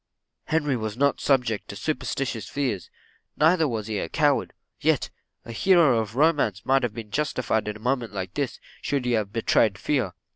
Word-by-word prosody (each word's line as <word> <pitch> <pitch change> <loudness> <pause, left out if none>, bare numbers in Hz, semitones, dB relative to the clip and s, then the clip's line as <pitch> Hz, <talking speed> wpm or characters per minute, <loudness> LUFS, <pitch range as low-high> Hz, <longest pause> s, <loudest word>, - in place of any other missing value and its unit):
Henry 150 -4 +1
was 110 -2 -4
not 140 +1 +2
subject 125 -6 +1
to - - -7
superstituous 135 -4 -3
fears 125 -11 -2 0.5
neither 160 +1 +4
was 110 -5 -3
he 105 -2 -2
a - - -4
coward; 145 -3 +2 0.3
yet - - +1 0.3
a - - -7
hero 155 - +4
of 110 0 -4
romance 140 - +2
might 135 0 +3
have 120 -4 -2
been 110 -3 -8
justified 125 -7 -1
in 105 0 -3
a 125 +5 +1
case 115 -2 -7
like 95 -2 -5
this, 140 -3 -3 0.2
should 140 -3 -1
he 125 - +1
have 110 -4 0
betrayed 110 -2 +2
fear. 125 -7 -1
125 Hz, 180 wpm, -25 LUFS, 110-145 Hz, 0.5 s, neither